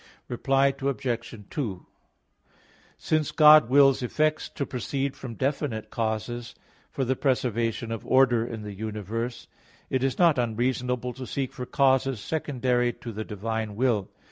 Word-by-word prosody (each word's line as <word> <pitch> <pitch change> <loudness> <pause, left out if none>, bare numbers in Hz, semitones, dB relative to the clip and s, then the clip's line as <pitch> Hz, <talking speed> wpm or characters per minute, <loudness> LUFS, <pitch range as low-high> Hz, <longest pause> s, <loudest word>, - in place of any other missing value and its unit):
Reply 135 +2 +2
Obj. 125 -4 -2 0.2
2: 105 - -4 1.1
Since 155 -1 0
God 150 -4 +7
wills 135 0 +5
effects 155 +5 0
to 140 - -4
proceed 135 +2 -3
from 120 -3 -8
definite 130 -5 -2
causes, 115 +2 -3 0.3
for 135 - -2
the 130 +2 +1
preservation 120 -3 0
of 115 - -4
order 130 -3 +4
in 115 -2 -6
the 105 -1 -6
universe, 110 +3 -4 0.4
it 130 -1 +1
is 135 -1 0
not 170 -7 +4
unreasonable 125 +1 -1
to 130 -1 -8
seek 135 -2 -3
for 125 - -6
causes 135 -2 +2
secondary 125 -3 0
to 115 - -8
the 110 0 -5
divine 110 0 -4
will. 115 -5 +1
125 Hz, 140 wpm, -26 LUFS, 115-135 Hz, 1.1 s, God